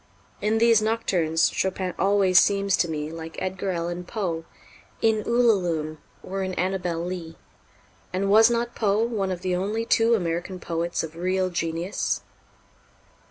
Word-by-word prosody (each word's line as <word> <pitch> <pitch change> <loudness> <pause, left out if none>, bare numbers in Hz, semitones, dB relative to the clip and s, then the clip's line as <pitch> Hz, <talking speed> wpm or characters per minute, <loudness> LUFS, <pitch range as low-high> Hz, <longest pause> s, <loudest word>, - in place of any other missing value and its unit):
In 215 +1 +1
these 230 -1 +5
Nocturnes, 185 -8 +1
Chopin 185 -1 -1
always 195 -2 +5
seems 200 -1 +2
to 170 - +1
me 150 -1 -3
like 165 0 -7
Edgar 190 +1 -3
Allan 175 0 -3
Poe 175 -5 -3 0.5
in 220 -1 +2
"Ullalume" 180 -10 +1 0.2
or 195 +1 -4
in 185 -1 -3
"Annabel 180 -2 -1
Lee" 175 -3 -6 0.7
and 195 +2 0
was 220 +2 +7
not 235 0 -1
Poe 210 0 +1
one 215 -5 -1
of 180 -2 -3
the 185 -1 0
only 210 +5 -1
two 230 0 +4
American 175 -1 -3
poets 170 0 -2
of 160 0 -7
real 185 +2 0
genius? 170 +2 -2
185 Hz, 145 wpm, -25 LUFS, 170-210 Hz, 0.7 s, was